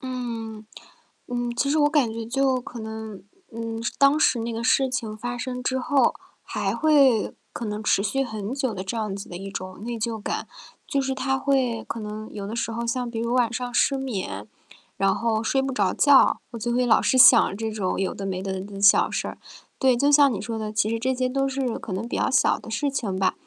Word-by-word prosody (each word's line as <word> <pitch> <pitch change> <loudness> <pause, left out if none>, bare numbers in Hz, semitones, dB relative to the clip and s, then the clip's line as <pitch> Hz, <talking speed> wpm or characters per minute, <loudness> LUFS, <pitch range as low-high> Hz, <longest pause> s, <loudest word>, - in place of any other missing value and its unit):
嗯， 230 -4 -5 0.6
嗯， 245 -1 -2
其 275 - 0
实 300 - +2
我 295 0 +4
感 285 -7 +2
觉 225 0 -5
就 260 +1 +1
可 240 -1 -9
能， 220 -3 -7 0.3
嗯， 230 0 -5
是 230 - -2
当 280 +2 +4
时 250 -6 +3
那 230 +1 -3
个 225 +1 -4
事 265 +1 +3
情 225 -5 -4
发 245 +3 -4
生 250 +1 -4
之 260 +1 -1
后， 275 +2 +2 0.3
还 - - -2
会 275 -8 +4 0.2
可 235 - -5
能 210 0 -4
持 205 - +2
续 270 +7 0
很 220 -2 -5
久 265 -4 -1
的 190 -2 -5
这 195 +5 -4
样 215 -3 -2
子 200 - -8
的 175 - -7
一 195 +2 -7
种 185 +1 -7
内 235 0 -4
疚 225 -1 -3
感。 - - -3 0.4
就 280 - 0
是 265 0 -2
它 265 0 -1
会 260 -4 0
可 230 - -4
能 215 0 -7
有 200 -2 -6
的 215 +3 -5
时 230 0 -2
候 235 +1 -3
像 245 +1 -2
比 230 -1 -4
如 235 +1 -1
晚 245 -2 +2
上 245 0 -4
失 275 +2 +2
眠， 190 - -4 0.5
然 195 0 +2
后 225 -1 0
睡 270 +4 +1
不 270 0 -2
着 200 -6 +1
觉， 285 -2 +5
我 235 - -6
就 240 +2 -2
会 250 +1 +2
老 225 -2 +4
是 260 - +2
想 220 -5 +7
这 220 0 -3
种 205 -4 -2
有 195 - -1
的 195 - -6
没 185 -1 -3
的 190 -1 -3
的 190 - -4
的 200 0 -8
小 200 +1 +6
事 - - -2
儿。 - - -7 0.4
对， 260 -3 +3
就 285 +4 +3
像 285 -1 +6
你 210 - -3
说 225 +2 -4
的， 215 -1 -4
其 215 0 +1
实 230 0 -1
这 260 +3 0
些 255 0 0
都 270 +1 0
是 265 -3 -2
可 255 - -8
能 195 +5 -3
比 - - -4
较 - - +1
小 265 - +3
的 - - -11
事 285 +6 -1
情 215 -9 -2
吧， 190 0 +2
235 Hz, 260 characters per minute, -24 LUFS, 215-260 Hz, 0.6 s, 想